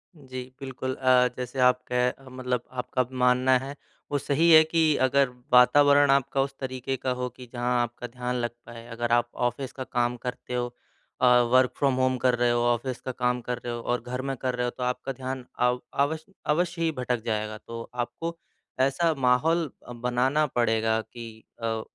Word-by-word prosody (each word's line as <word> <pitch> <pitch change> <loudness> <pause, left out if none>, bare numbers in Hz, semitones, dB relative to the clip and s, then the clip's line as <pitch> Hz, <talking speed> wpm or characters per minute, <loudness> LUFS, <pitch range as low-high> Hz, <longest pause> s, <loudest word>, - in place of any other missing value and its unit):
जी। 130 -3 -7 0.2
बिल्कुल, 130 -1 -4
अ, 130 -1 +4
जैसे 125 +1 -5
आपके 125 +1 +1
मतलब 125 -1 -3
आपका 130 0 -1 0.2
मानना 125 +1 +4
है 135 +2 -7 0.4
वो 145 - +2
सही 150 +5 +2
है 160 0 +9
कि 160 -2 +2
अगर 135 0 +3 0.2
वातावरण 145 +3 +6
आपका 135 0 +2
उस 135 0 -2
तरीके 130 0 -3
का 130 - -2
हो 125 - 0
कि 125 +1 -12
जहाँ 120 0 +1
आपका 120 +1 -4
ध्यान 125 +1 -4
लग 120 -1 -1 0.2
पाए। 115 0 -10
अगर 120 0 -3
आप 120 0 +3 0.2
ऑफ़िस 125 +2 -5
का 130 - -6
काम 120 -1 -1
करते 125 0 -5
हो 120 0 -2 0.5
अ, - - +5 0.3
वर्क 130 0 +5
फ्रॉम 140 -2 +2
होम 130 0 +1
कर 125 -1 +4
रहे 120 0 +3
हो, 120 - +2
ऑफ़िस 120 +1 0
का 130 - -4
काम 125 0 0
कर 125 +1 -3
रहे 120 -1 -3
हो 120 - -4
और 120 0 -1
घर 125 +1 -4
में 135 0 -3
कर 130 0 -2
रहे 125 0 -1
हो - - 0
तो 125 - -3
आपका 125 +2 -2
ध्यान 130 0 -5
अ, 125 - +4 0.2
अव 145 +3 +1 0.4
अवश्य 175 +1 -1
ही 165 -1 +2
भटक 125 -2 -1
जाएगा। 110 -1 -2
तो 115 +1 -9
आपको 165 +7 -4 0.4
ऐसा 140 +5 +2
माहौल 160 +7 +3 0.2
अ, - - -8
बनाना 125 +5 +1
पड़ेगा 110 -2 +1
कि 115 0 -10 0.3
अ, 110 -1 -1
125 Hz, 190 wpm, -26 LUFS, 120-135 Hz, 0.5 s, है